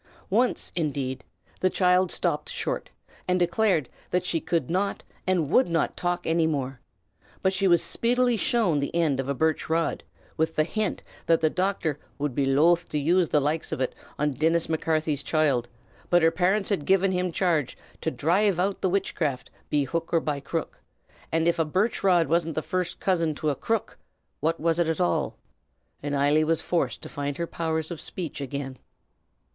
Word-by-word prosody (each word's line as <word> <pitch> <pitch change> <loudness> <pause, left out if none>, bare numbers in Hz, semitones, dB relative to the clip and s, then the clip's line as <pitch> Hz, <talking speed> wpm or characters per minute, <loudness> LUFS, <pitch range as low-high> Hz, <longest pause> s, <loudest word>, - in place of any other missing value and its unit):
Once, 240 +5 +1
indeed, 135 -6 -2 0.4
the 185 - +3
child 180 -1 +3
stopped - - -1
short, - - -3 0.4
and 180 0 +2
declared 175 - +2 0.2
that 180 0 0
she 165 - +1
could 165 -5 -1
not 195 +4 -1 0.2
and 170 -5 +1
would 255 - +5
not 165 -2 0
talk 175 0 -2
any 165 0 +2
more; 135 -4 -2 0.6
but 190 - +3
she 190 +1 +2
was 175 -2 +5
speedily 245 +1 +2
shown 210 -8 +2
the 140 +3 -3
end 155 -6 +2
of 135 +1 -2
a 140 - 0
birch 160 +3 0
rod, 165 +1 0 0.3
with 160 0 0
the 155 - +3
hint 215 +4 -2 0.2
that 165 -1 +4
the 155 -1 +2
doctor 180 -5 -1 0.2
"would 145 -2 -2
be 135 +1 0
loth 165 +6 +3
to - - -2
use 170 +4 +2
the 150 - +3
likes 150 +3 -1
av - - -2
it 130 - -1 0.2
on 150 0 +1
Dinnis 160 +5 +1
Macarthy's 155 -2 0
choild; 140 -6 +1 0.4
but 175 -1 +4
her 165 - +5
parints 185 +4 +1
had 190 -9 -1
given 195 0 +4
him 180 -1 0
charge 165 -7 0 0.2
to - - 0
dhrive 180 +5 +2
out 195 +2 0
the 190 - +2
witchcraft 175 -8 -1 0.2
be 145 -1 +2
hook 165 +4 -3
or 165 - +4
be 145 -3 -3
crook; 160 +3 -4 0.5
and 165 +1 +1
av 170 - +2
a - - +4
birch 190 +9 0
rod 180 -4 +4
wasn't 160 -2 0
first 180 -2 -2
cousin 165 -5 +1
to 150 +1 0
a - - -2
crook, 225 +6 -2 0.4
what 165 +2 0
was 165 +1 +1
it 170 - +2
at 160 -1 -1
all?" 85 - 0 0.6
and 145 0 -2
Eily 145 +2 +3
was 160 +1 +2
forced 175 - -1
to - - -6
find 145 0 -4
her 170 - -1
powers 160 -1 -2
of 170 - -5
speech 165 -5 -5
again. 135 -1 -5
165 Hz, 185 wpm, -26 LUFS, 150-180 Hz, 0.6 s, would